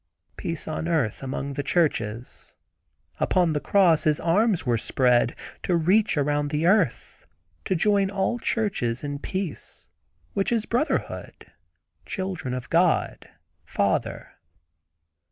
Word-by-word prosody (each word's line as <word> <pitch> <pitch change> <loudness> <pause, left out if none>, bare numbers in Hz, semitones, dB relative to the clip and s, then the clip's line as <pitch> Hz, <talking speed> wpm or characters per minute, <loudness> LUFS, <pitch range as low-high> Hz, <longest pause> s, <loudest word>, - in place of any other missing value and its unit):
Peace 165 -2 -4
on 160 +1 -3
earth, 155 -11 0
among 140 +1 -4
the 145 - -2
churches. 130 -7 -1 0.6
Upon 175 -3 +2
the 150 - 0
cross 175 -2 +3
His 155 -1 +3
arms 195 +2 +2
were 120 -3 +1
spread. 120 0 +2 0.3
To 180 - 0
reach 185 +3 +3
around 145 0 +1
the 150 +2 -1
earth, 180 - +1 0.4
to 190 - 0
join 200 +2 +2
all 200 +4 -1
churches 170 - -1
in 145 -1 -4
peace, 185 -1 -5 0.4
which 195 - 0
is 225 -2 +1
brotherhood; 250 +7 -2 0.6
children 185 -10 -3
of 125 -1 -6
God—Father." 170 0 -1
165 Hz, 120 wpm, -25 LUFS, 140-195 Hz, 0.6 s, cross